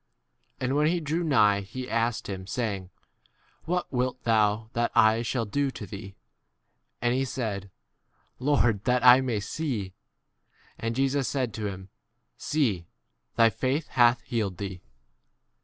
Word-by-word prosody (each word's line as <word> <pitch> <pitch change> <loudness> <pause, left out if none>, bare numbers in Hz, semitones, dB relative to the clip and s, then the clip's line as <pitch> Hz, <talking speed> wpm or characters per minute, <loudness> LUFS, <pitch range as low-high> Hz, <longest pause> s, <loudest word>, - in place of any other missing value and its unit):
And 130 +1 -1
when 150 +1 +3
he 165 - +2
41 - - -9
drew 160 +4 -1
nigh 105 -10 +4
he 125 +6 -7
asked 115 -2 -1
him, 95 -2 -6
saying, 100 -6 -3 0.8
What 180 -1 -2
wilt 125 0 -1
thou 110 0 +2
that 120 0 0
I 110 +1 +5
shall 115 0 -1
do 140 +6 0
to 115 - -7
thee? 100 0 -9 0.9
And 120 0 +2
he 130 +1 +1
said, 110 -7 -4 0.7
Lord, 120 -7 +2
that 125 0 +2
I 125 0 +9
42 - - -3
may 115 -4 0
see. 110 -4 -3 0.9
And 115 0 -2
Jesus 135 0 +1
said 130 -5 -1
to 110 -2 -3
him, 95 -1 -7 0.5
See: 110 - -1 0.5
thy 115 -1 +5
faith 130 +7 -1
hath 120 0 +4
healed 105 -6 -2
v 100 - -3
thee. 90 -1 -10
115 Hz, 155 wpm, -27 LUFS, 105-130 Hz, 0.9 s, I